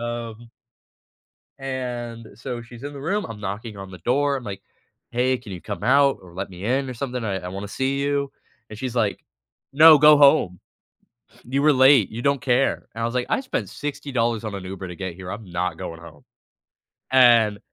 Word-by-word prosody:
um 120 Hz, -1 st, -6 dB, 1.1 s
and 120 Hz, -3 st, -5 dB
so, 120 Hz, +2 st, -6 dB
she's 120 Hz, +1 st, -13 dB
in 145 Hz, 0 st, -6 dB
the 140 Hz, -, -8 dB
room, 205 Hz, +6 st, -1 dB
I'm 110 Hz, -2 st, -8 dB
knocking 105 Hz, +2 st, -6 dB
on 95 Hz, -1 st, -8 dB
the 90 Hz, -, -9 dB
door, 140 Hz, -, +1 dB
I'm 125 Hz, -, -8 dB
like, 100 Hz, -2 st, -7 dB, 0.5 s
"Hey, 125 Hz, +2 st, +1 dB
can 110 Hz, -5 st, -12 dB
you 90 Hz, -, -7 dB
come 105 Hz, -, -6 dB
out 140 Hz, +1 st, +4 dB
or 90 Hz, -2 st, -15 dB
let 95 Hz, +2 st, -5 dB
me 90 Hz, +2 st, -8 dB
in 130 Hz, +2 st, 0 dB
or 130 Hz, -, -5 dB
something? 125 Hz, -1 st, -4 dB
I 100 Hz, -3 st, -1 dB
I 90 Hz, -, -7 dB
wanna 100 Hz, +2 st, -6 dB
see 135 Hz, +5 st, -1 dB
you." 140 Hz, 0 st, -1 dB, 0.4 s
And 110 Hz, -, -9 dB
she's 125 Hz, -2 st, -4 dB
like, 110 Hz, -4 st, 0 dB, 0.5 s
"No, 155 Hz, +1 st, +9 dB
go 150 Hz, 0 st, +7 dB
home. 140 Hz, -, +4 dB, 0.9 s
You 135 Hz, +3 st, -1 dB
were 150 Hz, -, +5 dB
late, 130 Hz, -5 st, +5 dB
you 115 Hz, +2 st, -6 dB
don't 140 Hz, -1 st, +1 dB
care." 125 Hz, +1 st, +1 dB
And 115 Hz, -, -5 dB
I -, -, 0 dB
was 115 Hz, -, -2 dB
like, 125 Hz, -1 st, 0 dB
"I -, -, +2 dB
spent 260 Hz, -, -3 dB
$60 130 Hz, -6 st, -2 dB
on 105 Hz, -2 st, -4 dB
an 95 Hz, -, -6 dB
Uber 95 Hz, 0 st, -7 dB
to 90 Hz, -, -8 dB
get 95 Hz, -3 st, -5 dB
here, 95 Hz, +1 st, -8 dB
I'm 105 Hz, -2 st, -7 dB
not 85 Hz, -1 st, -2 dB
going 80 Hz, -1 st, -7 dB
home." 80 Hz, -3 st, -14 dB, 0.9 s
And 120 Hz, -5 st, +5 dB
120 Hz, 205 wpm, -23 LUFS, 100-135 Hz, 1.1 s, No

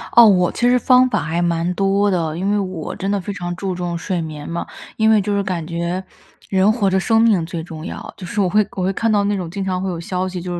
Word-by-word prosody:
哦， 235 Hz, -, +10 dB
我 180 Hz, -4 st, +4 dB
其 245 Hz, +1 st, +1 dB
实 250 Hz, -, +4 dB
方 255 Hz, +1 st, +5 dB
法 -, -, 0 dB
还 165 Hz, +3 st, -1 dB
蛮 170 Hz, +1 st, 0 dB
多 195 Hz, +2 st, +2 dB
的， 165 Hz, -4 st, -1 dB
因 190 Hz, +2 st, -1 dB
为 205 Hz, -, +2 dB
我 185 Hz, -5 st, -4 dB
真 195 Hz, -, -3 dB
的 205 Hz, -, +1 dB
非 200 Hz, +3 st, -5 dB
常 175 Hz, -2 st, -4 dB
注 185 Hz, 0 st, -3 dB
重 175 Hz, -1 st, -3 dB
睡 175 Hz, 0 st, -2 dB
眠 150 Hz, -2 st, -7 dB
嘛。 170 Hz, 0 st, -3 dB, 0.3 s
因 220 Hz, 0 st, +3 dB
为 215 Hz, -2 st, +5 dB
就 205 Hz, +1 st, -1 dB
是 200 Hz, -, +1 dB
感 180 Hz, -4 st, -3 dB
觉， 170 Hz, +2 st, -3 dB, 0.5 s
人 195 Hz, +2 st, +4 dB
活 210 Hz, -4 st, +1 dB
着 190 Hz, -, +2 dB
生 225 Hz, +3 st, +3 dB
命 205 Hz, -8 st, +3 dB
最 170 Hz, 0 st, -5 dB
重 160 Hz, -1 st, -8 dB
要， -, -, -7 dB
就 185 Hz, -, -9 dB
是 205 Hz, +4 st, -4 dB
我 195 Hz, -, +3 dB
会 210 Hz, +2 st, +3 dB
我 185 Hz, -, -1 dB
会 190 Hz, +2 st, 0 dB
看 225 Hz, +3 st, 0 dB
到 205 Hz, -1 st, +3 dB
那 205 Hz, 0 st, +1 dB
种 180 Hz, -4 st, -4 dB
经 195 Hz, +1 st, -3 dB
常 185 Hz, -1 st, -1 dB
会 190 Hz, -, -2 dB
有 170 Hz, -2 st, -4 dB
消 185 Hz, +2 st, -2 dB
息 180 Hz, -1 st, -5 dB
就 175 Hz, 0 st, -4 dB
185 Hz, 300 characters per minute, -19 LUFS, 175-205 Hz, 0.5 s, 哦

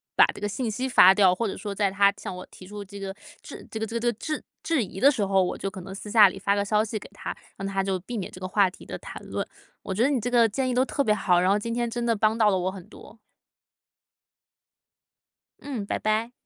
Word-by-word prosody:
把 -, -, +8 dB
这 -, -, -11 dB
个 205 Hz, -, -1 dB
信 225 Hz, +2 st, -3 dB
息 255 Hz, +5 st, -2 dB
发 190 Hz, -6 st, +8 dB
掉， 190 Hz, -2 st, +4 dB
或 230 Hz, -, -2 dB
者 -, -, -4 dB
说 205 Hz, -2 st, -5 dB
在 200 Hz, -1 st, +1 dB
他 200 Hz, +1 st, +4 dB
向 185 Hz, -, -6 dB
我 180 Hz, -, -7 dB
提 185 Hz, -, -13 dB
出 205 Hz, +2 st, -8 dB
这 200 Hz, +1 st, -11 dB
个 195 Hz, 0 st, -5 dB, 0.3 s
质 -, -, -10 dB
这 220 Hz, -, -5 dB
个 220 Hz, -, -1 dB
这 225 Hz, +2 st, -7 dB
个 -, -, +1 dB
这 240 Hz, -, -1 dB
个 -, -, -9 dB
质 305 Hz, +8 st, -4 dB, 0.2 s
质 315 Hz, -8 st, +1 dB
疑 190 Hz, 0 st, -8 dB
的 280 Hz, +2 st, +6 dB
时 225 Hz, -7 st, -1 dB
候， 195 Hz, -1 st, +3 dB
我 180 Hz, -, -2 dB
就 195 Hz, -, -4 dB
可 190 Hz, -1 st, -9 dB
能 190 Hz, +2 st, -9 dB
私 205 Hz, +1 st, -8 dB
下 210 Hz, -2 st, +7 dB
里 195 Hz, -, -9 dB
发 200 Hz, +1 st, +1 dB
个 200 Hz, 0 st, 0 dB
消 210 Hz, +1 st, +2 dB
息 215 Hz, 0 st, -4 dB
给 -, -, -9 dB
他， -, -, -6 dB, 0.2 s
让 195 Hz, -, -4 dB
他 195 Hz, 0 st, -1 dB
就 190 Hz, -1 st, -1 dB
避 235 Hz, +6 st, -6 dB
免 195 Hz, -, -5 dB
这 185 Hz, -, -12 dB
个 185 Hz, -, -3 dB
话 195 Hz, -1 st, +3 dB
题 -, -, -15 dB
的 -, -, -5 dB
谈 -, -, -9 dB
论。 -, -, -3 dB, 0.4 s
我 190 Hz, -, -4 dB
觉 210 Hz, -, -1 dB
得 265 Hz, -, +4 dB
你 270 Hz, -4 st, +1 dB
这 245 Hz, +3 st, -3 dB
个 230 Hz, -2 st, +5 dB
建 260 Hz, +5 st, -1 dB
议 255 Hz, -, 0 dB
都 255 Hz, +1 st, +3 dB
特 280 Hz, +1 st, -1 dB
别 215 Hz, -, +3 dB
好， 185 Hz, -4 st, +2 dB
然 185 Hz, +2 st, +3 dB
后 205 Hz, -, +3 dB
今 230 Hz, +2 st, -4 dB
天 240 Hz, 0 st, -1 dB
真 240 Hz, +1 st, -3 dB
的 235 Hz, -1 st, +2 dB
帮 215 Hz, +1 st, +2 dB
到 220 Hz, -2 st, +4 dB
了 190 Hz, -, +2 dB
我 185 Hz, +1 st, -1 dB
很 190 Hz, -2 st, -10 dB
多。 225 Hz, -, -15 dB, 2.4 s
嗯， 250 Hz, -8 st, -5 dB
拜 -, -, -2 dB
拜。 215 Hz, +2 st, 0 dB
205 Hz, 305 characters per minute, -26 LUFS, 195-230 Hz, 2.4 s, 把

